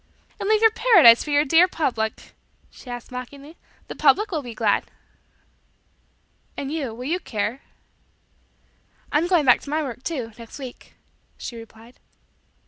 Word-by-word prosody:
"And 395 - -3
leave 435 0 +3
your 445 - +6
paradise 425 - +6
for - - -8
your 290 +1 +3
dear 330 +5 +5
public?" 240 -11 -3 0.4
she - - -16
said 245 -1 -8
mockingly. 275 +5 -9 0.3
"The - - -8
public 305 +10 +3
will 315 -4 -2
be 240 -4 -9
glad." 215 -3 0 1.7
"And 280 0 -4
you, 295 -6 -3
will 250 +2 -8
you 340 +6 -1
care?" 215 - -4 1.5
"I'm 315 +4 +1
going 350 -5 +2
back 250 - +5
to - - -10
my 310 +1 -1
work, 250 -3 -7
too, 260 -7 -4
next 230 -1 -11
week," 260 -3 -11 0.4
she 240 - -7
replied. 225 +1 -14
275 Hz, 150 wpm, -23 LUFS, 235-320 Hz, 1.7 s, your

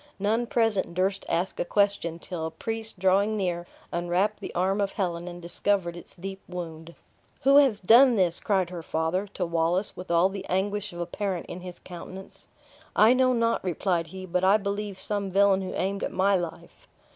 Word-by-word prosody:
None 220 +4 0
present 225 -7 +1
durst 190 +2 0
ask 175 +3 -1
a - - +2
question, 200 -3 +1
till 170 -2 -5
a - - -4
priest 225 +5 -5
drawing 195 +3 +2
near, 175 -3 -2 0.2
unwrapped 175 +5 0
the - - -6
arm 190 +3 +1
of 200 -1 -1
Helen, 175 -3 -2
and 175 0 -7
discovered 175 0 -1
its 175 - -11
deep 195 +2 -7
wound. 170 -2 -7 0.5
"Who 275 +2 +6
has 265 -8 +5
done 240 +6 +6
this?" 180 -4 +3
cried 190 -4 0
her 175 -2 -5
father, 160 +5 -1
to 190 -2 -3
Wallace, 170 +3 0
with 180 - -9
all 170 +2 +4
the 195 0 -6
anguish 205 +2 -1
of 175 0 -6
a - - -1
parent 185 0 -3
in 175 - -7
his 180 -1 -9
countenance. 185 +2 -10 0.5
"I 220 +3 +6
know 255 0 +3
not," 230 -1 +1
replied 175 -2 0
he; 185 +3 -8
"but 180 0 -1
I 195 +3 +6
believe, 200 -1 -4
some 200 0 -1
villain 195 0 +4
who 185 - -5
aimed 195 +2 -1
at - - -2
my 195 +1 +3
life." 175 -3 -6
190 Hz, 190 wpm, -27 LUFS, 175-205 Hz, 0.5 s, Who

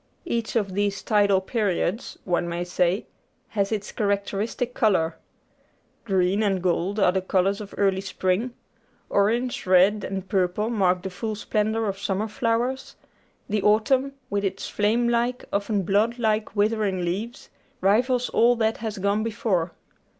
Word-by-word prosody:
Each 230 0 -2
of 200 -5 0
these 200 0 -1
tidal 200 -3 +3
periods, 205 0 -1
one 175 -1 0
may 170 +1 -2
say, 180 +2 0 0.4
has 200 -1 -1
its 210 -2 -3
characteristic 205 +4 -1
colour: 175 -9 +2 0.9
green 190 0 +2
and 195 -3 +1
gold 185 +3 0
are 190 -2 +5
the 190 0 0
colours 195 +2 +1
of 200 - -9
early 195 -1 +2
spring; 195 +5 -1 0.6
orange, 230 +3 +1
red, 190 +3 +4
and 190 -1 -4
purple 190 +4 0
mark 185 -5 +2
the 190 - -4
full 215 +4 -4
splendour 220 +1 -1
of 195 -1 -3
summer 200 +2 -1
flowers; 235 +4 -1 0.5
the 210 0 0
autumn, 260 +7 +2 0.2
with 200 0 0
its 195 - -2
flame 225 +4 +1
like, 240 +1 0
often 200 0 0
blood 210 +6 +1
like, 220 -2 0
withering 205 -3 +1
leaves, 215 +9 -4 0.3
rivals 245 +6 +2
all 240 +1 +4
that 220 -1 0
has 220 -2 -4
gone 200 +2 +1
before. 210 -6 -1
205 Hz, 145 wpm, -25 LUFS, 190-225 Hz, 0.9 s, are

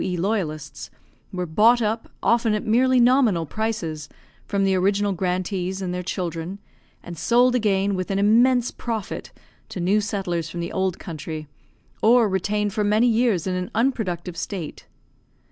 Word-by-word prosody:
E. 180 -1 -2
loyalists, 170 -6 -3 0.4
were 180 -1 -3
bought 215 +9 +4
up, 225 0 -2
often 230 -2 +3
at 210 - -3
merely 255 +3 +3
nominal 240 -9 +4
prices, 165 -7 -3 0.4
from 200 -1 0
the 195 0 +2
original 200 +2 +1
grantees 185 +1 -2
and 185 -2 -3
their 180 - -3
children, 175 0 -4 0.5
and 175 - -8
sold 245 +7 +3
again 200 -4 +1
with 185 -1 -3
an 195 - 0
immense 235 +4 +4
profit 225 -4 -5 0.4
to - - -6
new 195 +5 +2
settlers 190 -5 -2
from 175 - -6
the 170 - -4
old 190 -2 -1
country, 155 -2 -7 0.5
or 235 0 +5
retained 205 +2 -1
for 215 -1 0
many 210 +3 +3
years 230 -7 +2
in 185 - -1
an 180 0 -3
unproductive 195 -8 -1
state. 180 -3 -6
195 Hz, 155 wpm, -23 LUFS, 180-225 Hz, 0.5 s, or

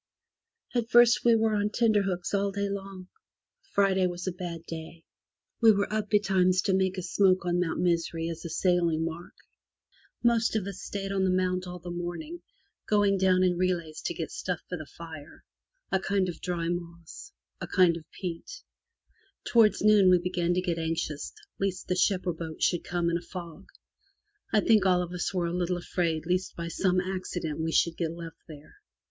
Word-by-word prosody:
At 235 -2 -1
first 240 0 +6
we 235 -1 +5
were 220 -1 +2
on 205 0 +1
tenterhooks 205 -6 +1
all 200 0 +1
day 200 0 -2
long. 195 -2 -7 0.7
Friday 190 -2 +3
was 175 0 -5
a 185 - -1
bad 175 -2 -6
day. 165 0 -8 0.6
We 225 -1 +8
were 200 0 0
up 215 -1 -1
betimes 185 -3 +3
to 195 - +1
make 190 0 +1
a 185 - -3
smoke 185 0 +2
on 175 0 +1
Mount 175 -2 -1
Misery 170 -1 0
as 165 -1 -6
a 170 - -5
sailing 170 -3 +1
mark. 165 +1 -7 0.9
Most 235 -2 +3
of 210 -4 0
us 195 -2 -6
stayed 195 -1 -4
on 195 -1 0
the 190 - +2
Mount 185 0 0
all 180 0 -6
the 175 0 -8
morn 175 - -4
ing, 335 +3 -9 0.5
going 205 -2 +3
down 185 -1 +4
in 180 -1 +1
relays 175 -4 -1
to 170 - -2
get 165 - -4
stuff 180 -2 -3
for 180 - -4
the 155 -3 -8
fire 160 -2 -11 0.2
— - - -49
a 190 - +2
kind 195 0 0
of 170 - -7
dry 170 -2 -2
moss, 170 - -6 0.3
a - - -5
kind 180 -3 +4
of 160 -2 -10
peat. 185 - -7 0.8
Towards 225 -4 +4
noon 210 -3 +6
we 180 - +6
began 175 0 -1
to 180 - +1
get 175 -2 -2
anxious 160 -2 -3 0.3
lest 195 -2 -2
the - - +1 0.3
boat 175 -2 -3
or 160 -1 -4
ship - - -16
should 175 - +1
come 175 -1 -1
in 170 - 0
a - - -14
fog. 175 +1 -9 0.8
I 215 - +4
think 215 -3 +4
all 180 -2 +3
of 175 0 -7
us 180 - -2
were 180 -3 -1
a 170 - -2
little 180 0 -1
afraid 170 -2 -1
lest 180 +2 -1
by 170 0 -5
some 185 +2 +1
accident 180 -4 -4
we 160 0 -1
should 165 0 +2
get 165 -1 -2
left 165 -1 -9
there. 155 - -13
180 Hz, 195 wpm, -28 LUFS, 170-195 Hz, 0.9 s, We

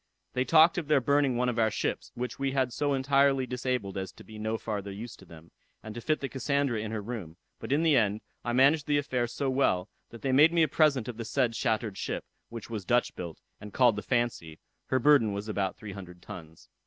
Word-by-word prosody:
They 125 0 0
talked 165 +3 +5
of 160 - -7 0.2
burning 140 -3 +3
one 125 +1 +1
of 120 -1 -1
their 110 -1 +3
ships, - - -3
which 125 +1 -5
we 135 -1 -1
had 130 -3 0
so 145 -1 0
entirely 135 0 +3
disabled 125 -6 -2
as 95 -1 -5
to - - -14
be 110 -1 -11
no 110 +1 -1
farther 100 -3 -4
useful 100 -1 -9
to - - -25
them, 85 0 -14 0.3
and 110 - -7
to 120 - -7
fit 155 +5 0
the 135 - -2
Cassandra 140 -3 0
in 105 0 -4
her 110 -2 -4
room; 100 -8 -6 0.2
but - - -7
in 150 +4 +2
the 160 -3 +4
end 105 -3 +2 0.2
I 120 - -2
managed 140 +5 +4
the 145 -1 +3
affair 125 -4 -1
so 135 +4 -3
well, 105 -8 +1 0.2
that 115 -2 -12
they 135 - +1
made 150 +5 +6
me 170 -1 +4
a - - +3
present 145 -5 +2
of 120 -3 -6
the 115 - -4
said 120 0 0
shattered 110 -4 -1
ship, - - -3 0.2
which 115 -2 -8
was 110 -4 -5
Dutch 120 +4 +1
built, 85 -3 -7 0.2
and 105 -1 -10
called 120 -4 +4
the 105 - -4
Fancy; 120 -11 -2 0.3
her 130 - +1
burden 130 -5 +4
was 100 +2 -5
about 100 -3 -2
three 105 - -8
hundred 90 -2 -10
tons. 80 -1 -11
120 Hz, 235 wpm, -29 LUFS, 105-135 Hz, 0.3 s, made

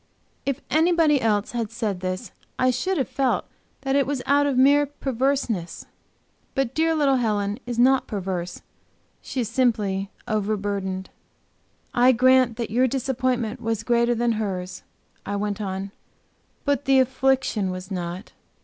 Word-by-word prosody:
If 275 0 -1
anybody 320 -3 +4
else 210 -2 +1
had 230 -3 -2
said 215 -4 -3
this 185 +3 -4 0.3
I 255 0 +3
should 355 +10 -1
have 265 - 0
felt 265 -2 0 0.4
that 270 0 0
it 280 -2 +3
was 275 -3 -2
out 285 0 +3
of 275 -3 0
mere 285 +2 +5
perverseness. 265 -9 -2 0.7
But 270 -2 0
dear 320 +2 +2
little 280 -3 +3
Helen 210 -2 0
is 240 -2 -3
not 260 +2 +4
perverse; 185 -4 -4 0.6
she 260 - -3
is 230 - -2
simply 210 -6 0 0.2
overburdened. 200 -3 -2 0.8
"I 250 +1 +5
grant 255 -1 +4
that 230 -3 -3
your 250 +3 +3
disappointment 255 -2 -1
was 225 -2 -2
greater 235 0 +2
than 235 +1 +1
hers," 190 -5 -3 0.4
I 205 - -3
went 205 0 -2
on. 195 0 -4 0.7
"But 285 -1 0
the 270 0 +5
affliction 260 -5 +1
was 185 +1 -6
not. 180 +2 -5
240 Hz, 145 wpm, -24 LUFS, 205-265 Hz, 0.8 s, mere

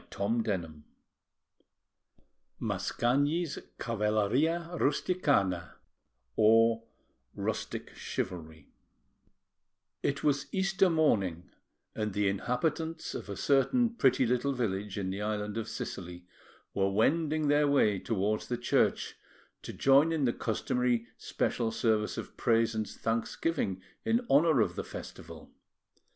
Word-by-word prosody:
[Illustration: 100 -7 -2 1.8
MASCAGNI] 145 +8 0 0.3
CAVALLERIA 115 +10 0
RUSTICANA 140 - +1 1.6
(Rustic - - -4
Chivalry) 80 -4 -5 1.3
It 140 -1 -1
was 140 -2 +1
Easter 195 0 +2
morning, 100 - +1 0.4
and 105 -2 -3
the 105 0 +1
inhabitants 155 - -2
of - - -6
a 100 - -4
certain 145 - +2
pretty 130 - +3
little 125 +4 +1
village 105 -5 -2
in 95 -2 -2
the 100 +2 -4
island 105 0 -2
of 115 -1 -3
Sicily 90 -1 -6 0.5
were 95 0 +1
wending 155 +9 +1
their 145 0 +4
way 110 -9 +3
towards 105 0 -1
the 120 - -2
church 120 - +1 0.4
to - - -7
join 140 +4 +4
in 155 -4 +1
the 120 - +2
customary 120 +1 0
special 115 -2 -1
service 110 -1 0
of - - -7
praise 115 0 +2
and 110 -2 -2
thanksgiving 115 - -2 0.2
in 230 +2 +1
honour 150 -2 +5
of - - 0
the - - -3
festival. - - -10
115 Hz, 110 wpm, -30 LUFS, 105-145 Hz, 1.8 s, honour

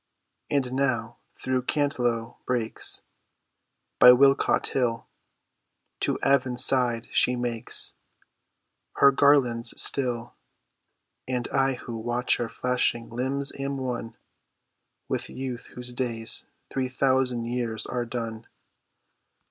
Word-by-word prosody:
And 130 -3 -1
now 130 -4 -1 0.2
through 130 0 -2
Cantlow 125 -5 -2
brakes, 120 -3 0 1.0
By 125 - +9
Wilmcote 135 +2 +4
hill, 120 -3 -1 0.9
To - - -1
Avon 135 -2 +1
side, 125 -3 +3
she 125 - +2
makes 120 -2 0 1.0
Her 140 - +5
garlands 135 -4 +3
still, 120 -3 +3 0.9
And 125 -1 -2
I 135 0 +1
who 120 -1 -8
watch 120 +2 0
her 120 -1 -3
flashing 125 -1 -1
limbs 135 +3 -1
am 140 0 -3
one 125 -3 -5 0.9
With - - -2
youth 130 -2 -6
whose 125 0 -5
days 115 -3 0 0.2
three 130 -1 -2
thousand 130 -2 0
years 115 -2 -2
are 125 -1 -3
done. 115 -2 -6
125 Hz, 105 wpm, -25 LUFS, 120-130 Hz, 1.0 s, By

